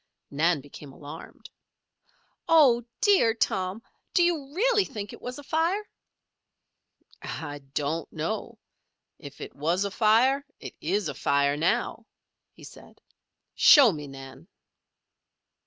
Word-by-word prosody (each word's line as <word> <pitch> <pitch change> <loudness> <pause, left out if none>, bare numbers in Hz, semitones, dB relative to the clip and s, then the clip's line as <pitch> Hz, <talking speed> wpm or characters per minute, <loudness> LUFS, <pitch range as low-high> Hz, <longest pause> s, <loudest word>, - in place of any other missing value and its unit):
Nan 155 +1 +1
became 145 0 -12
alarmed. 150 +3 -11 1.0
"Oh, 270 -8 +5 0.2
dear, 375 - +4
Tom! 195 -1 -2 0.3
Do 350 - +5
you 315 -6 -1
really 445 +1 +3
think 205 - -7
it - - -12
was 250 +1 -6
afire?" 330 +8 -1 1.3
"I, 145 -2 -6 0.2
don't 150 +3 -2
know. - - -4 0.6
If - - -12
it - - -8
was 170 +7 0
afire, 230 +7 +3 0.2
it - - -9
is 195 +6 -1
afire 140 0 +1
now," 225 +8 -1 0.4
he - - -18
said. - - -14 0.5
"Show 275 -7 +7
me, 150 -4 -7
Nan." 135 +2 -12
205 Hz, 110 wpm, -26 LUFS, -, 1.3 s, Show